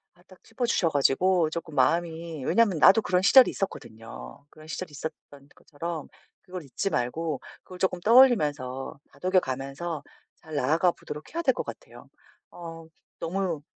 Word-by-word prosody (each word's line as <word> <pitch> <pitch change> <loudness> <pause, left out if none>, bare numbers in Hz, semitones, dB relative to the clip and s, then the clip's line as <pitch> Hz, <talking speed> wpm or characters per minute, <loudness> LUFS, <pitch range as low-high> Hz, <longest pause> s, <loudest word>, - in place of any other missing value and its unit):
아 175 - -25
딱 185 - -19
짚어 240 +2 -3
주셔 175 -7 +2
가지고 160 +4 +2
쪼끔 165 -1 -6
마음이 165 -3 0
왜냐하면 215 -7 +3
나도 205 +7 +7
그런 180 -1 +1
시절이 255 +6 +7
있었거든요. 115 - -7
그런 155 0 -16
시절이 160 +2 -6
있었던 145 -1 -9
것처럼 160 +1 -6 0.3
그걸 180 -2 -8
잊지 140 +9 -2
말고 155 +1 -2 0.2
그걸 185 - -11
쪼끔 180 -2 0
떠올리면서 150 - +3
다독여 185 +1 +2
가면서 140 +3 -5 0.4
잘 155 -1 -9
나아가 160 +7 +2
보도록 150 - -10
해야 335 - -1
될 265 -6 +3
것 - - -4
같아요. - - -11 0.4
어 165 -1 -9 0.3
너무 175 -3 -2
165 Hz, 345 characters per minute, -27 LUFS, 145-185 Hz, 0.4 s, 나도